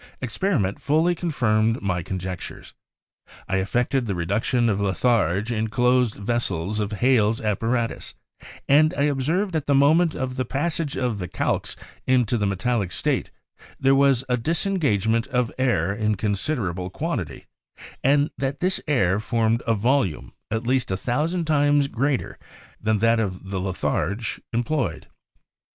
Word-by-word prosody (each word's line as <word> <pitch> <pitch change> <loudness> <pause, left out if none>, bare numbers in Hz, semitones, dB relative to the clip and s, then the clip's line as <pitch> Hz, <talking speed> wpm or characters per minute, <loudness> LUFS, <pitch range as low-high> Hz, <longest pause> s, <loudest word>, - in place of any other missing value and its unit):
Experiment 130 - -1
fully 160 +4 +2
confirmed 115 -9 +1
my 95 -3 -1
conjectures. 90 0 -6 0.7
I 95 - 0
effected 120 +6 0
the 100 - -1
reduction 105 +7 0
of 105 -2 0
litharge 100 0 +1
in 110 -1 -1
closed 125 0 +2
vessels 105 -3 -1
with 105 0 -2
Hales' 115 -1 +2
apparatus, 115 +3 -2 0.5
and 155 +3 +4
I 140 - +1
observed 150 +8 0
that - - +2
at 155 - -3
the 140 - +3
moment 155 +4 +4
of 130 0 -3
the 130 - +1
passage 145 +3 -2
of 120 -5 -1
the 90 - -4
calx - - -2 0.3
into 125 -3 +3
the 105 - +1
metallic 100 0 -1
state, - - -1 0.5
there 135 0 +4
was 135 -2 +4
a 125 -1 +1
disengagement 120 - 0
of 125 -3 0
air 100 -8 +1
in 105 0 0
considerable 100 - -2
quantity, 100 - -4 0.6
and 145 +2 +3
that 135 +1 -2
this 185 +1 0
air 105 -10 +2
formed 115 +1 +1
a 115 - +3
volume 115 - 0 0.2
at 110 +2 -2
least 130 0 +1
a 95 - -1
thousand 155 - -1
times 145 -2 +3
greater 140 +1 -2 0.4
than 110 0 +1
that 115 +2 +3
of 95 -2 -4
the 95 - -1
litharge 95 +2 -2
employed. 120 - -1
120 Hz, 145 wpm, -24 LUFS, 100-140 Hz, 0.7 s, and